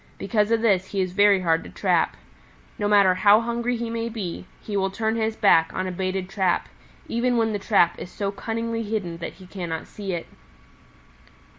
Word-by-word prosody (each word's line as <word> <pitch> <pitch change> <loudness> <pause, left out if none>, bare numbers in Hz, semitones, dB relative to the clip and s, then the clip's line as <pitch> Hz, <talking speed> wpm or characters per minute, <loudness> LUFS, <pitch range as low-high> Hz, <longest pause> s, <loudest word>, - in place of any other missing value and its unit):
Because 210 -2 0
of 230 0 +1
this 190 -4 +3
he 200 - -3
is 185 -1 -1
very 200 -1 +5
hard 165 -2 +1
to - - -10
trap. 90 - +1 0.6
No 205 - +1
matter 200 -3 +5
how 205 +3 +5
hungry 235 +1 -1
he 235 0 -3
may 230 0 -2
be, 190 -6 -5
he 210 - -6
will 195 -1 +1
turn 220 +3 -1
his 220 -1 -1
back 165 -6 +4
on 185 - -1
a 185 - -3
baited 185 +1 -2
trap, 190 -2 0 0.4
even 245 +1 0
when 225 -1 +1
the 205 - -2
trap 195 -5 +2
is - - -7
so 200 +1 -3
cunningly 230 +3 -3
hidden 205 -6 -3
that 170 - -6
he 185 - -15
cannot 175 -4 -5
see 195 -3 -6
it. 170 - -4
200 Hz, 195 wpm, -24 LUFS, 185-225 Hz, 0.6 s, very